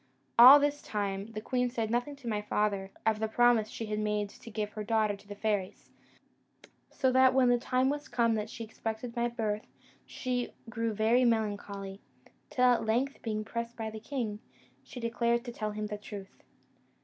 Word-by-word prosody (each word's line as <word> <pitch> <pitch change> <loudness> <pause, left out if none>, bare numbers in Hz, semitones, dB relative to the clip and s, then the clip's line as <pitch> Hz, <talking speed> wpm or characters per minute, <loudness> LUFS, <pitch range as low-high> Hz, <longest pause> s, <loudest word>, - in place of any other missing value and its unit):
All 260 +4 +12
this 290 0 0
time 200 -1 -3
the 215 - -4
queen 250 +2 0
said 225 -3 -2
nothing 245 +5 -1
to 275 -4 -11
my 210 -2 -1
father 205 -2 -1 0.2
of 220 -1 +2
the 220 - 0
promise 230 -1 +3
she 225 - -5
had 210 0 -2
made 210 -1 -1
to 230 - -13
give 210 -1 -3
her 215 -1 -5
daughter 215 -1 +1
to 200 - -19
the 205 - -7
fairies; 205 -3 -2 1.0
so 260 -2 +1
that 260 0 +5
when 255 -2 +5
the 245 0 +4
time 255 +1 +1
was 290 +2 -2
come 230 -2 +2
that 215 0 -2
she 230 - -7
expected 225 +2 -5
my 240 0 +1
birth, 220 -3 -3 0.4
she 250 -2 -3 0.2
grew 230 -1 -1
very 220 +4 +3
melancholy; 205 -4 -1 0.5
till 255 - +2
at 245 -1 +4
length, 245 +6 0
being 215 -2 -3
pressed 235 +1 -5
by 220 -1 -4
the 220 - -7
king, 225 -4 -4 0.4
she 250 - -10
declared 235 0 0
to 240 - -5 0.2
him 210 0 -4
the 210 0 -5
truth. 200 -2 -10
225 Hz, 185 wpm, -30 LUFS, 210-245 Hz, 1.0 s, All